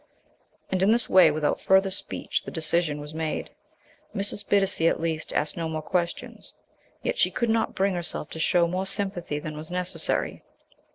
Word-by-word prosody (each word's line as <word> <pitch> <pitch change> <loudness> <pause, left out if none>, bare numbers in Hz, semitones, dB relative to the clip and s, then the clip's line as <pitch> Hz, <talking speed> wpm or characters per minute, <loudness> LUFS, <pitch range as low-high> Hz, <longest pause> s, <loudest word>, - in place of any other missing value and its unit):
And 185 -1 0
in 195 - +4
this 235 0 +2
way, 185 -3 +7
without 150 0 -1
further 190 0 +3
speech, 190 - -3
the - - -8
decision 160 -1 0
was 150 +1 -8
made. 160 -1 -3 0.6
Mrs. 200 +1 +1
Bittacy, 195 -5 +4
at - - -1
least, 160 -1 -2
asked 150 - -1
no 165 -1 -3
more 155 -1 -4
questions. 175 +1 -3 0.5
Yet - - -2
she - - +4
could 235 -2 -1
not 225 0 0
bring 195 0 +1
herself 175 -3 -4
to 160 - -6
show 170 +1 +3
more 185 +3 -2
sympathy 190 -6 -2
than 150 0 -6
was 155 +1 -7
necessary. 180 0 +1
175 Hz, 175 wpm, -26 LUFS, 160-195 Hz, 0.6 s, way